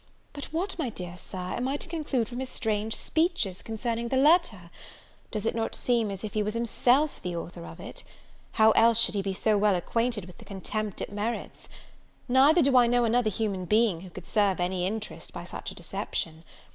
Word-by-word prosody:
But 285 - -6
what, 345 +4 -3
my 280 -6 0
dear 180 -5 -7
Sir, 185 - -10 0.2
am 250 - -1
I 275 +2 -1
to - - -8
conclude 300 -8 -1
from 245 +2 -6
his 260 -1 -4
strange 220 -2 -1
speeches 320 - 0
concerning 230 +1 -3
the 260 - 0
letter? 270 - +3 0.6
Does 215 -1 -3
it - - +1
not 225 -1 -2
seem 235 -4 +1
as 195 0 -6
if 215 - -5
he 215 - +1
was 210 +1 -2
himself 245 +5 +2
the 180 -1 -4
author 165 - -6
of 80 - -11
it? - - -9 0.5
How 220 0 +6
else 230 +1 +5
should - - +5
he 200 - 0
be 195 -1 -3
so 210 +1 +2
well 205 -1 +4
acquainted 230 +3 -1
with 180 - -14
the - - -11
contempt 205 +1 -4
it - - -4
merits? 210 +3 -4 0.6
Neither 275 +7 +5
do 270 -1 +3
I 245 -1 +6
know 245 0 +3
another 230 0 +2
human 200 -3 -2
being 210 -3 +2
who 185 - -10
could 180 0 -11
serve 205 -4 +2
any 180 0 0
interest 215 +1 -6
by - - -6
such - - -6
a - - -9
deception. 160 0 -4
220 Hz, 210 wpm, -28 LUFS, 195-245 Hz, 0.6 s, How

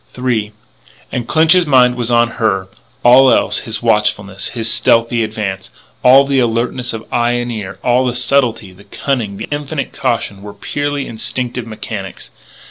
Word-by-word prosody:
III 120 -5 -1 0.6
And 120 -1 -3
Clinch's 165 +4 +4
mind 125 -3 +5
was 120 -1 -3
on 120 0 +3
her. 95 -4 +1 0.4
All 130 +2 +7
else - - +2
his 110 -2 -5
watchfulness, 105 -3 0
his 115 -2 -4
stealthy 115 +1 +2
advance 105 -3 -4 0.3
all 135 +2 +7
the 135 -1 +1
alertness 120 +1 -1
of 115 -1 -7
eye 120 0 +1
and 120 0 -2
ear, 100 -4 -6
all 125 +1 +2
the 120 - -2
subtlety, 125 -6 0
the 100 +2 -18
cunning, 115 -8 -3
the 110 - -6
infinite 145 0 -4
caution 105 -4 -2
were 105 0 -9
purely 145 -1 -3
instinctive 120 +1 -4
mechanics. 105 -3 -7
120 Hz, 155 wpm, -15 LUFS, 110-125 Hz, 0.6 s, All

